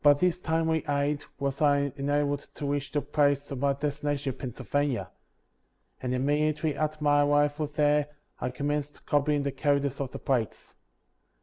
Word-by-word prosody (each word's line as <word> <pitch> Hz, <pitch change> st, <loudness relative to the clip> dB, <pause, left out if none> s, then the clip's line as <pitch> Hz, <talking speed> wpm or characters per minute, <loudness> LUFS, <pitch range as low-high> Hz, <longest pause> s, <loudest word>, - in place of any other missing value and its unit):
By 145 Hz, -1 st, +7 dB
this 180 Hz, +3 st, +1 dB
timely 160 Hz, -1 st, +1 dB
aid 145 Hz, +1 st, 0 dB
was 140 Hz, +2 st, -2 dB
I 140 Hz, -2 st, +3 dB
enabled 145 Hz, 0 st, 0 dB
to 145 Hz, -, -5 dB
reach 145 Hz, 0 st, -2 dB
the 145 Hz, -, 0 dB
place 145 Hz, -1 st, +1 dB
of 135 Hz, -, -3 dB
my 140 Hz, +1 st, +2 dB
destination 145 Hz, -1 st, -2 dB
in 130 Hz, -, -19 dB
Pennsylvania; 135 Hz, +1 st, -2 dB, 0.9 s
and 125 Hz, 0 st, -1 dB
immediately 150 Hz, +3 st, +1 dB
after 155 Hz, 0 st, -2 dB
my 145 Hz, 0 st, +5 dB
arrival 145 Hz, +1 st, +2 dB
there 150 Hz, 0 st, +2 dB, 0.3 s
I -, -, -1 dB
commenced 145 Hz, +3 st, -3 dB
copying 145 Hz, 0 st, +2 dB
the 140 Hz, -, -1 dB
characters 140 Hz, 0 st, 0 dB
off 135 Hz, -, -2 dB
the -, -, -7 dB
plates. 120 Hz, -5 st, -2 dB
145 Hz, 160 wpm, -28 LUFS, 140-150 Hz, 0.9 s, By